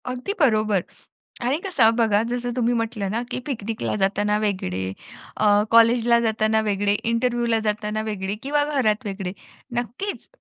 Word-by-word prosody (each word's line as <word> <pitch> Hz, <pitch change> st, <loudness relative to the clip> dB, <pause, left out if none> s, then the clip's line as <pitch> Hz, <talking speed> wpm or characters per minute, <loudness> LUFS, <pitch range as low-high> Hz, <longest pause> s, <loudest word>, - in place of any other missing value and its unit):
अगदी 250 Hz, +10 st, -3 dB
बरोबर. 215 Hz, -, +3 dB, 0.6 s
आणि 250 Hz, +4 st, +1 dB
कसं 240 Hz, -12 st, +3 dB
बघा 220 Hz, -3 st, +3 dB
जसं 245 Hz, 0 st, -2 dB
तुम्ही 245 Hz, -1 st, +1 dB
म्हटलं 225 Hz, -4 st, -2 dB
ना, 230 Hz, +2 st, -1 dB
की 250 Hz, -, -2 dB
पिकनिकला 225 Hz, -5 st, -3 dB
जाताना 205 Hz, +1 st, +1 dB
वेगळे 185 Hz, -, -2 dB, 0.5 s
अ, 205 Hz, -1 st, +4 dB
कॉलेजला 235 Hz, +1 st, +5 dB
जाताना 220 Hz, -1 st, +1 dB
वेगळे, 205 Hz, 0 st, +1 dB, 0.2 s
इंटरव्ह्यूला 235 Hz, -1 st, +1 dB
जाताना 210 Hz, +1 st, -1 dB
वेगळे 195 Hz, -1 st, -3 dB
किंवा 290 Hz, +2 st, +1 dB, 0.2 s
घरात 220 Hz, -1 st, +1 dB
वेगळे, 195 Hz, -2 st, -4 dB, 0.5 s
नक्कीच. 245 Hz, -, -4 dB
225 Hz, 140 wpm, -23 LUFS, 210-240 Hz, 0.6 s, कॉलेजला